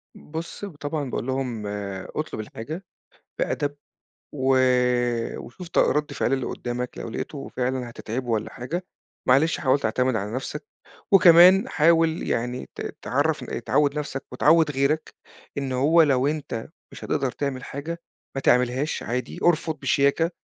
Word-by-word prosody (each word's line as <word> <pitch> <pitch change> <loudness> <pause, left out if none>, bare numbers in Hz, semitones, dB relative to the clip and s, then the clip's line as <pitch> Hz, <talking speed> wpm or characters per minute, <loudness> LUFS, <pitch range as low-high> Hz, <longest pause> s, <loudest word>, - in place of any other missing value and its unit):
بُص 165 +6 -7
ب 190 - -9
طبعًا 145 -1 -3
باقول 120 - -3
لهم: 125 -5 -2 0.5
"اطلُب 155 -7 -3
الحاجة 130 - -6 0.6
بِأَدَب 145 -1 -1 0.6
و 135 -1 +2 0.8
وشوف 170 +9 -9
ط - - -1
رَد 150 -1 +2
فعل 135 - 0
اللي 130 -2 0
قُدّامك، 125 0 -4
لو - - -5
لقيته 135 +5 -5
فعلًا 125 -1 -2
هتتعبه 120 +2 -5
والّا 110 -2 -1
حاجة، 170 +9 -4 0.4
معلش 145 +6 +4
حاول 135 0 +3
تعتمد 125 +1 +1
على 105 0 -3
نفسك 150 +3 -4 0.5
وكمان 185 +4 +8
حاول 165 +1 +3
يعني 125 +2 -2
ت - - -8 0.2
تعرّفن - - -1
تعوِّد 150 0 +2
نفسك 140 -2 -4
وتعوِّد 160 +4 +4
غيرك 140 +3 0 0.4
إن 135 -2 -2
هو 150 +6 +5
لو 135 -3 +3
أنت 145 -6 -3 0.2
مش - - -9
هتقدر 135 -4 0
تعمل 135 -3 -3
حاجة، 165 +5 -5 0.3
ما 135 - -2
تعملهاش 125 +4 +2
عادي، 125 +3 -3
ارفُض 160 -2 +2
بشياكة 140 +4 +2
140 Hz, 140 wpm, -25 LUFS, 125-160 Hz, 0.8 s, وكمان